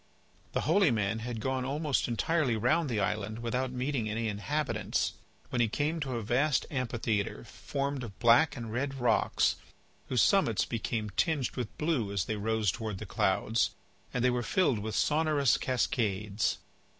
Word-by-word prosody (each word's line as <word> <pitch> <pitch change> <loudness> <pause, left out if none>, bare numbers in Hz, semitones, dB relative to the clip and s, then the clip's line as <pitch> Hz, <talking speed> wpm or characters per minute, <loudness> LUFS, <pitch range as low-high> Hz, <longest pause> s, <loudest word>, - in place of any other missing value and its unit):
The - - +1
holy 175 +4 +4
man 110 -2 0
had 115 0 -4
gone 130 +2 -1
almost 145 +2 0
entirely 130 +2 +1
round 145 +8 +2
the 115 -4 0
island 105 +1 -1
without 125 +2 -2
meeting 125 -3 -1
any 115 +1 -1
inhabitants, 140 +9 -1 0.4
when 120 - 0
he 115 - +4
came 150 +8 -1
to 135 -4 -3
a 115 - -3
vast 135 +7 +2
amphitheatre 115 -6 -1
formed 140 -1 -4
of 105 -4 -8
black 120 +6 +4
and 115 -2 -6
red 135 +3 -1
rocks 120 -4 +2 0.5
whose 125 - +3
summits 150 - +3
became 110 -2 -3
tinged 145 - 0
with 125 -4 -5
blue 150 -10 0
as 100 -5 0
they 110 - -2
rose 110 -1 +1
towards 110 -3 -4
the - - -7
clouds, 115 +1 +1 0.4
and 125 0 0
they 125 - +4
were 125 0 0
filled 140 - +2
with 110 +1 -4
sonorous 150 -4 +3
cascades. 105 -5 0
120 Hz, 160 wpm, -30 LUFS, 110-140 Hz, 0.5 s, holy